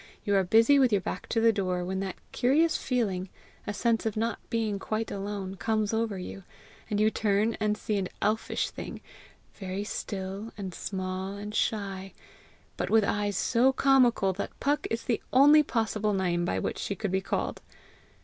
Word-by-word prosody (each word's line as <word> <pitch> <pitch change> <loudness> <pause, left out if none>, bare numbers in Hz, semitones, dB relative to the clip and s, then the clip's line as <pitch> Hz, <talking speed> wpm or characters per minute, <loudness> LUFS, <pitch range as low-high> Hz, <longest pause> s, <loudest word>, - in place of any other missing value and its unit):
You 205 - +1
are 195 - +4
busy 225 +9 +5
with 255 -3 +4
your 205 - +4
back - - -5
to 230 - +1
the 225 0 +5
door 185 -3 -1
when 190 +1 -2
that 190 -1 -3 0.2
curious 310 +6 +3
feeling, 195 -7 -1 0.4
a - - 0
sense 230 +1 +1
of 220 -1 -2
not 225 0 -1
being 220 -3 -1
quite 215 +3 -3
alone, 195 -1 -4
comes 215 0 0
over 220 -3 0
you, 185 +2 -7 0.5
and 205 - 0
you 215 +1 +4
turn 215 +1 +1
and 210 0 +1
see 215 -1 -2
an 185 - -3
elfish 215 +2 0
thing, - - -7 0.5
very 190 0 -4
still 200 +1 -5
and 190 -3 -5
small 185 +1 -4
and 205 +1 -7
shy, 195 -3 -2 0.6
but - - -2
with 220 -1 +5
eyes 205 0 0
so 255 +2 +3
comical 255 -7 +4
that 200 - -6
Puck 290 +2 0
is 225 0 -2
the 235 - 0
only 290 +4 +7
possible 220 -5 0
name 175 -3 0
by 95 - -1
which 95 - -2
she 200 - -2
could 205 -1 -3
be 190 0 +1
called. - - -2
210 Hz, 180 wpm, -28 LUFS, 195-225 Hz, 0.6 s, only